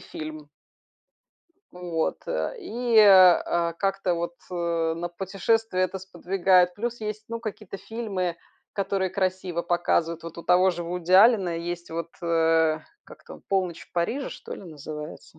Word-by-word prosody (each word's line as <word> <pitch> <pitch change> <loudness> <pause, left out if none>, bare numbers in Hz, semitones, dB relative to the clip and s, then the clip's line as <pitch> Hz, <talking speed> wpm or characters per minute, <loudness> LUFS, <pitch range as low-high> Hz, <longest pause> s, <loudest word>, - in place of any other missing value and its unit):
фильм. 155 -1 -8 1.2
Вот, 175 -2 -2
э, - - -2
и, 240 - 0
а, 180 -4 +6
как-то 195 -2 0
вот, 170 0 -3 0.2
э, 170 -2 -1
на 175 +1 -4
путешествия 195 +3 -1
это 185 +1 0
сподвигает. 180 -1 +2
Плюс, 235 +2 -4
есть 215 0 -5
ну 230 0 -5
какие-то 215 -3 -7
фильмы, 195 -7 -3 0.4
которые 195 -1 -1
красиво 185 -2 -2
показывают. 170 -1 0
Вот 165 0 -9
у 170 - -7
того 180 +2 +4
же 175 0 -5
Вуди 180 +1 -3
Аллена 195 -4 +6
есть 175 +1 -5
вот, 165 0 -4
э 165 -1 +2 0.3
Как - - -15
там? - - -11
"Полночь 185 -4 0
в - - -44
Париже", 230 +11 -1
что - - -8
ли, - - -11
называется. 155 -1 -9
180 Hz, 145 wpm, -25 LUFS, 170-195 Hz, 1.2 s, а